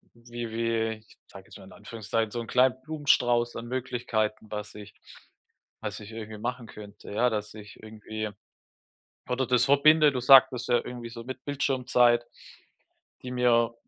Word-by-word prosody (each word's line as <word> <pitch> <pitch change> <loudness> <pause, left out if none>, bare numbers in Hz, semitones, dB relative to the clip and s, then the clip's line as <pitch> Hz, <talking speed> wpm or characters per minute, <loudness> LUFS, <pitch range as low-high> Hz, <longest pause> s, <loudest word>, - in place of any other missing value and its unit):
wie 120 -1 -7
wie 115 0 -1 0.2
ich - - -21
sage - - -13
jetzt - - -13
mal - - -14
in - - -15
Anführungszeichen, 110 -1 -4
so 120 - -4
'n 115 - -9
kleinen 125 0 +3
Blumenstrauß 125 -5 +1
an 115 +1 -6
Möglichkeiten, 120 -4 -2
was 105 0 -6
ich 105 -1 -11 0.9
was - - -5
ich 105 - -11
irgendwie 110 -1 -8
machen 120 +1 -4
könnte, 105 -1 -12
ja, 120 +4 +2
dass 105 -2 -4
ich 105 -2 -12
irgendwie 110 0 -6 1.0
oder 125 +1 -1
das 125 -1 +3
verbinde. 150 +2 +5
Du 125 - -2
sagtest 125 -1 +6
ja 120 - +4
irgendwie 120 -1 -7
so 115 0 -9
mit 130 +1 -8
Bildschirmzeit, 125 -4 +2 1.0
die 125 - -6
mir 120 -2 +2
120 Hz, 160 wpm, -27 LUFS, 110-125 Hz, 1.0 s, sagtest